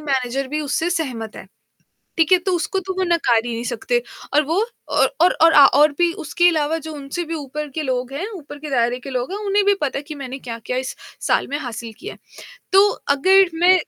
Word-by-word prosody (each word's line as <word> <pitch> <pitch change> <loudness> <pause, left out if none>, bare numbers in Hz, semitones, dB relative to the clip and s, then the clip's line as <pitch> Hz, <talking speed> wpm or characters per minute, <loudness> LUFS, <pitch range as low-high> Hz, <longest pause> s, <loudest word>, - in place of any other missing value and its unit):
Manager 270 -2 -1
भी 305 +2 -2
उससे 300 +4 -1
सहमत 250 -10 -3
है, - - -9 0.7
ठीक 330 +2 +2
है? 365 - +8
तो 365 +2 -2
उसको 345 +4 -1
तो 380 0 -5
वो 375 - +1
नकार 325 -10 +2
ही 240 - -3
नहीं 230 +1 -4
सकते 240 0 -1 0.3
और 300 +1 +4
वो 330 +5 0 0.3
और - - +3
और 360 - +5
और 330 0 +7
और 290 +1 +7
भी 345 -1 +3
उसके 345 +4 +2
अलावा 315 -1 0
जो 315 - -6
उनसे 285 +4 -5
भी 330 - -6
ऊपर 300 0 -5
के 310 +3 -4
लोग 255 -1 -2
हैं, 345 +9 -3
ऊपर 290 -4 -10
के 305 - -7
दायरे 245 -2 +1
के 275 - -9
लोग 255 +3 -3
हैं, 395 - -3
उन्हें 400 0 +2
भी 405 - +5
पता 285 -3 -1
है - - -10
कि 305 +1 -8
मैंने 270 -1 -7
क्या-क्या 235 +1 -5
इस 260 0 -4 0.3
साल - - +2
में 285 - -3
हासिल 235 -4 -6
किया 415 +5 -7
है। - - -19 0.5
तो 390 +2 +7 0.3
अगर 380 +4 +5
मैं 350 +3 +5
295 Hz, 230 wpm, -20 LUFS, 255-345 Hz, 0.7 s, है